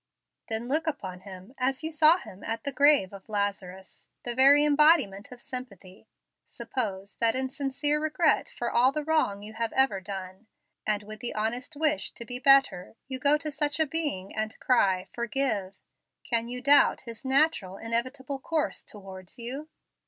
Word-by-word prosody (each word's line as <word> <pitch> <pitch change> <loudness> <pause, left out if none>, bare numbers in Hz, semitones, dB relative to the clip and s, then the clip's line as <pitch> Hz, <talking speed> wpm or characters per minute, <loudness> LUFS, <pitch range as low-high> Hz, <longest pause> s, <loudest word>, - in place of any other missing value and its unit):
"Then 225 +1 -2
look 310 +5 -1
upon 190 -12 -4
Him 190 +4 -12
as 260 +3 0
you 320 - -3
saw 310 +2 +6
Him 195 - -12
at 225 0 -4
the 280 - -1
grave 280 -8 +4
of 195 +2 -12
Lazarus, 195 -2 -4 0.2
the 240 - -3
very 280 +4 +6
embodiment 290 - +3
of 250 - -11
sympathy. 210 -8 -8 0.4
Suppose 200 -6 -5
that 230 0 +2
in 260 0 -1
sincere 290 +2 0
regret 310 +1 +1
for 240 - -4
all 250 +3 +4
the 300 +1 -3
wrong 290 -11 0
you 215 +1 -9
have 230 0 -2
ever 265 -8 +2
done, 190 +1 -8 0.4
and 210 -1 0
with 215 +1 -10
the 245 - -4
honest 230 +6 -2
wish 305 0 -1
to 235 - -9
be 245 +2 -4
better, 270 -8 +4
you 260 -1 -4
go 285 +3 +4
to 305 0 -5
such 295 +1 -1
a 315 - +4
being 285 - -3
and 215 0 -4
cry, 190 -7 +2
'Forgive.' 235 -6 -2 0.5
Can 230 -1 -1
you 250 +1 -6
doubt 285 +2 +5
His 230 -1 -9
natural, 265 - +1
inevitable 255 +5 -3
course 315 +2 -2
towards 190 -3 -11
you? 265 +6 -6
245 Hz, 170 wpm, -27 LUFS, 205-285 Hz, 0.5 s, saw